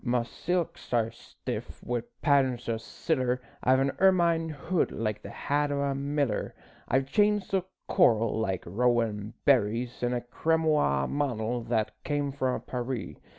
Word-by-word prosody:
My 120 -1 +1
silks 175 +7 -3
are 115 -1 +2
stiff - - -7
wi' 120 -1 -1 0.2
patterns 130 -5 +3
o' 115 -1 0
siller, 125 +1 -1 0.2
I've 130 +1 +4
an 135 0 +2
ermine 170 -4 +4
hood 160 +4 -1
like 105 -2 -2
the - - -8
hat 145 0 0
o' 140 - 0
a 140 -1 0
miller, 140 -4 -1 0.3
I've 130 +1 +2
chains 210 -2 +2
o' 190 -2 +2 0.2
coral 115 - +3
like 95 -4 -1
rowan 110 +1 0
berries, 120 -2 +2
An' 120 0 +1
a 120 - -1
cramoisie 150 - +1
mantle 120 -4 -1
that 110 -2 0
cam' 145 -1 -1
frae 130 -2 0
Paris. 125 -1 -3
130 Hz, 150 wpm, -28 LUFS, 115-145 Hz, 0.3 s, I've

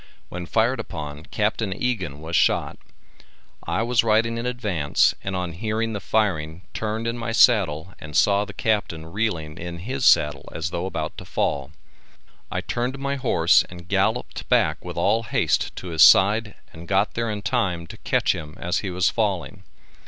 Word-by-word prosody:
When 90 -1 -6
fired 115 +6 +1
upon 75 -1 -6
Capt. 105 +1 -1
Egan 95 - -2
was 80 +2 -4
shot. - - +2 0.9
I - - 0
was 120 -1 +2
riding 115 +1 +2
in 120 - -3
advance 105 -12 +1
and 95 -1 -3
on 90 -2 -2
hearing 110 +5 -2
the 105 - -3
firing 90 -6 -1
turned 110 +1 -3
in 115 +1 -2
my 115 0 -3
saddle 95 -8 +3
and 75 -1 -4
saw 100 0 +4
the 105 - -8
Captain 100 -6 -1
reeling 85 -4 -3
in 85 0 -6
his 125 +9 -4
saddle 75 -8 +3
as 80 +2 -3
though 85 +2 -2
about 80 -4 -4
to - - -9
fall. 70 -2 -1 0.8
I - - -1
turned 125 +3 -2
my 140 0 -2
horse 130 - +4
and 85 0 -11
galloped - - -1
back - - +2
with - - -7
all 115 - +2
haste 115 - 0
to 95 - -7
his 80 -2 0
side 105 +5 +6 0.2
and 85 +2 -11
got 100 +1 +1
there 115 0 -2
in 105 -1 -4
time 95 -6 0
to - - -11
catch - - +1
him 75 0 -8
as 90 +1 -1
he 95 - -4
was 90 +1 +1
falling. 100 -2 -2
100 Hz, 175 wpm, -23 LUFS, 85-115 Hz, 0.9 s, side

